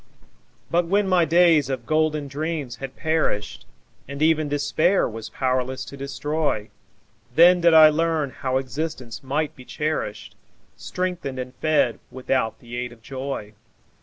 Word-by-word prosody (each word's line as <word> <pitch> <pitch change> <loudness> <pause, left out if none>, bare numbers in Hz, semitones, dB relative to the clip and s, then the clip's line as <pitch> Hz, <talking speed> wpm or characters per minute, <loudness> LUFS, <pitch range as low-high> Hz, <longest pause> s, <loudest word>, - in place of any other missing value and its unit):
But 175 0 +2
when 200 +2 +2
my 180 -3 +4
days 165 -4 +4
of 130 -3 -3
golden 155 -1 +1
dreams 150 -2 -4
had 135 -1 -7
perished, 155 -10 -1 0.4
And 140 +1 -7
even 155 -1 +2
Despair 155 +6 +2
was 115 0 -7
powerless 130 0 -1
to 120 - -10
destroy, 140 -4 -2 0.6
Then 175 +3 +7
did 170 -1 +5
I 155 -1 +9
learn 155 -2 0
how 130 0 -2
existence 135 -1 -5
might 145 +3 -2
be 130 - -12
cherished, 135 -8 -4 0.4
Strengthened 180 -7 -4
and 125 0 -5
fed 155 -7 +1
without 130 -2 -1
the 120 0 -9
aid 125 0 -3
of 115 -2 -17
joy. 130 -5 -5
145 Hz, 140 wpm, -23 LUFS, 130-160 Hz, 0.6 s, I